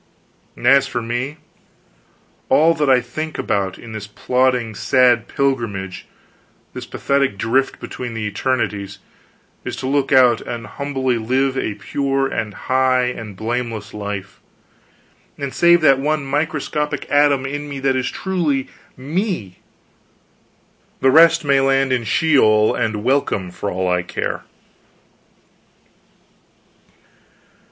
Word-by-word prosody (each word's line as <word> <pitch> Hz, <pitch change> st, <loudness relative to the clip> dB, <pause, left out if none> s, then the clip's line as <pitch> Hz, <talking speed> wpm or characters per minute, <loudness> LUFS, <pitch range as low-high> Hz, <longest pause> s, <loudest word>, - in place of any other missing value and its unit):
And -, -, -9 dB
as 135 Hz, +1 st, +5 dB
for 125 Hz, -2 st, -3 dB
me, 120 Hz, +6 st, -3 dB, 1.1 s
all 160 Hz, +2 st, +5 dB
that 150 Hz, -4 st, 0 dB
I 130 Hz, -2 st, +5 dB
think 155 Hz, +6 st, -5 dB
about 95 Hz, -2 st, -1 dB
in 115 Hz, -, -11 dB
this 110 Hz, -1 st, -6 dB
plodding 125 Hz, 0 st, 0 dB
sad 120 Hz, +1 st, +3 dB
pilgrimage, 115 Hz, -9 st, -2 dB, 0.7 s
this -, -, -7 dB
pathetic 140 Hz, -7 st, 0 dB
drift 130 Hz, +6 st, 0 dB
between 120 Hz, -2 st, -6 dB
the 110 Hz, -1 st, -3 dB
eternities, 105 Hz, -4 st, -2 dB, 0.7 s
is -, -, -4 dB
to 130 Hz, -, -5 dB
look 140 Hz, 0 st, 0 dB
out 125 Hz, -4 st, +5 dB
and 115 Hz, -2 st, -6 dB
humbly 130 Hz, +1 st, -2 dB
live 130 Hz, +4 st, 0 dB
a 110 Hz, -6 st, -2 dB
pure 135 Hz, +4 st, -1 dB
and 110 Hz, -5 st, -3 dB
high 130 Hz, -1 st, +1 dB
and 110 Hz, -5 st, -7 dB
blameless 115 Hz, 0 st, -4 dB
life, 100 Hz, -2 st, -6 dB, 1.0 s
and 140 Hz, -2 st, -4 dB
save 170 Hz, 0 st, +5 dB
that 135 Hz, -4 st, +5 dB
one 150 Hz, +1 st, -1 dB
microscopic 150 Hz, +1 st, -2 dB
atom 145 Hz, -2 st, +3 dB
in 145 Hz, +2 st, -4 dB
me 140 Hz, -1 st, -5 dB
that 135 Hz, -1 st, +1 dB
is 130 Hz, -1 st, -1 dB
truly 165 Hz, -8 st, -1 dB, 0.3 s
me: 145 Hz, -, -3 dB, 1.4 s
the 135 Hz, -, +4 dB
rest 165 Hz, +1 st, +6 dB
may 140 Hz, -1 st, +4 dB
land 135 Hz, -1 st, +2 dB
in 120 Hz, -2 st, -1 dB
Sheol 110 Hz, -6 st, +3 dB
and 110 Hz, -2 st, -2 dB
welcome 120 Hz, -8 st, 0 dB
for 100 Hz, -, -4 dB
all 95 Hz, 0 st, -2 dB
I 90 Hz, 0 st, +1 dB
care. 85 Hz, -, -4 dB
130 Hz, 125 wpm, -19 LUFS, 110-140 Hz, 1.4 s, rest